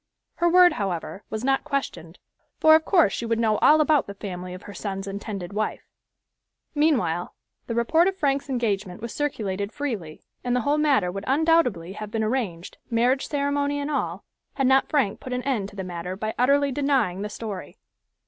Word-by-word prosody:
Her 345 0 +3
word, 360 0 +7
however, 185 -1 -4
was 220 +1 -4
not 270 +1 +1
questioned, 270 - -4 0.4
for 315 - +6
of 315 0 +5
course 340 - +4
she 235 - -3
would 230 0 +1
know 220 -2 +2
all 310 - +6
about 305 -2 +3
the 200 - -7
family 185 -2 -6
of 185 - -11
her 205 - -9
son's 195 -2 -4
intended 200 -2 -6
wife. 215 +1 -2 0.9
Meanwhile 240 - +1 0.3
the 230 - -3
report 320 +9 +3
of 385 0 -1
Frank's 280 -3 0
engagement 210 -7 -1
was 235 +1 -6
circulated 205 -8 -2
freely, 215 - -5 0.2
and 245 0 0
the 250 - +1
whole 290 +4 +1
matter 270 -12 +2
would 195 +2 -6
undoubtedly 270 - +2
have 215 +1 -7
been 220 +1 -1
arranged, 215 -8 -3
marriage 245 +3 +2
ceremony 285 0 0
and 285 +1 -3
all, 285 - -2 0.3
had 270 - +1
not 265 +1 +4
Frank 265 -10 +1
put 255 - -6
an 250 0 -2
end 230 -8 -1
to - - -16
the 190 - -4
matter 180 0 -5
by 215 +2 -3
utterly 280 +3 +3
denying 265 -9 +1
the 210 - -3
story. 210 -3 -7
235 Hz, 185 wpm, -25 LUFS, 195-285 Hz, 0.9 s, word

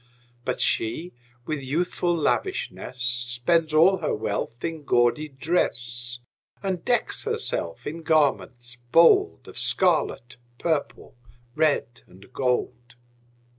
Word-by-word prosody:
But - - -2
she, 155 +11 0 0.3
with 155 0 -3
youthful 175 +4 0
lavishness, 130 -4 -2
Spends 125 +7 0
all 170 +5 +5
her 160 - -1
wealth 110 +3 -3
in 165 -2 -4
gaudy 120 +4 +2
dress, 125 -5 -2 0.5
And 190 -3 -2
decks - - 0
herself 85 -1 -2
in 165 +3 -5
garments 130 -6 0
bold 280 - +5
Of - - -6
scarlet, 155 -9 +1 0.2
purple, 160 -4 -2 0.4
red, 145 -6 +1
and 95 +7 -18
gold. 125 -2 -2
140 Hz, 105 wpm, -25 LUFS, 120-165 Hz, 0.5 s, all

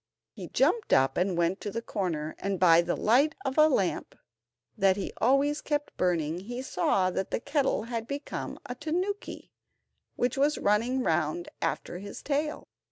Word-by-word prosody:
He - - -8
jumped 465 - +1
up 135 0 +4
and 180 0 0
went 170 +3 +1
to 210 - -3
the 230 +3 -4
corner, 165 -9 -3
and 195 -2 -2
by 170 -2 +6
the 175 0 -2
light 275 +8 +3
of 265 - 0
the 310 +2 +5
lamp 195 - -1 0.6
that 195 -2 +3
he 195 - -4
always 275 +4 +3
kept 295 -1 -2
burning 170 -2 0
he 240 +7 -6
saw 185 -4 +1
that 190 - -2
the - - -1
kettle 275 -3 0
had 230 -1 -4
become 280 +2 -5
a 245 - -4
tanuki, 355 +9 -4 0.6
which 245 +2 0
was 295 +2 +3
running 235 +6 +1
round 160 0 0
after 175 - -2
his 200 +1 -9
tail. 300 +1 -2
220 Hz, 165 wpm, -28 LUFS, 180-280 Hz, 0.6 s, by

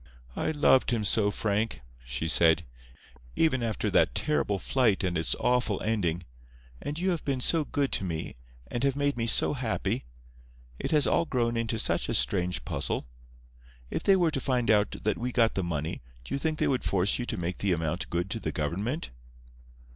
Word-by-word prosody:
"I - - -1
loved 145 -4 +4
him 115 -3 +1
so, 105 0 +2
Frank!" 105 -3 -1 0.2
she 60 +6 -3
said, 80 0 +4 0.7
"even 155 -6 +2
after 115 -2 -1
that - - +3
terrible 150 -9 +1
flight 115 -2 +1
and 90 -2 0
its 80 -1 +1
awful 125 -5 +1
ending. 90 -6 0 0.6
And 145 +1 -4
you 185 +2 +1
have 170 - -2
been 135 -2 -1
so 160 +5 +2
good 140 -1 -1
to - - 0
me, 80 -4 -4 0.3
and 120 - -4
have 135 -1 +2
made 145 0 0
me 115 -1 -2
so 115 - +3
happy. 120 - -2 0.7
It - - -2
has 150 -2 +3
all 170 - +2
grown 120 -5 0
into 115 0 -1
such - - 0
a - - +1
strange 90 -8 0
puzzle. - - -2 0.9
If - - -2
they 195 - +5
were 175 -4 +2
to 135 - -2
find 125 -3 +1
out 105 -1 +2
that 105 - 0
we 125 +1 -2
got 115 -2 +3
the 95 - -1
money 80 -2 -3 0.2
do - - -7
you 140 - 0
think 155 +2 -1
they - - +1
would 130 -2 0
force 95 +3 +1
you 120 - -3
to - - -3
make 90 +1 -3
the 100 - +1
amount 85 +2 -1
good 90 +3 -2
to 115 - -2
the 80 - -3
government?" 100 - -3
115 Hz, 195 wpm, -28 LUFS, 90-135 Hz, 0.9 s, they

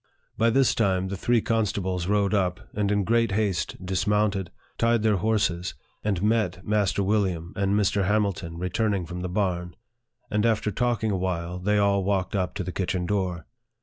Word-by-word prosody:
By 115 +1 +3
this 135 +2 +3
time, 95 -4 +1
the 100 - -3
three 120 +4 +2
constables 95 -6 -1
rode 100 0 +2
up, 90 -3 +1
and 105 -1 0
in 100 -1 +2
great 115 0 +2
haste 100 -5 0
dismounted, 100 0 0 0.3
tied 115 -1 +2
their 110 -2 +3
horses, 95 -6 0 0.3
and 100 -3 0
met 105 -3 +1
Master 100 -2 +1
William 95 -4 0
and 100 0 +1
Mr. 100 -2 +2
Hamil 105 -1 +2
ton 85 -1 -8
returning 95 +2 0
from 90 +2 -6
the 90 - -3
barn; 90 -2 -1 0.6
and 105 0 +1
after 110 -2 +1
talking 115 0 0
awhile, 90 -2 -2
they 105 +3 +1
all 100 -1 +3
walked 95 0 0
up 95 -2 -1
to 100 - -2
the 90 - -4
kitchen 90 -1 -2
door. 90 -4 -1
100 Hz, 175 wpm, -26 LUFS, 90-105 Hz, 0.6 s, By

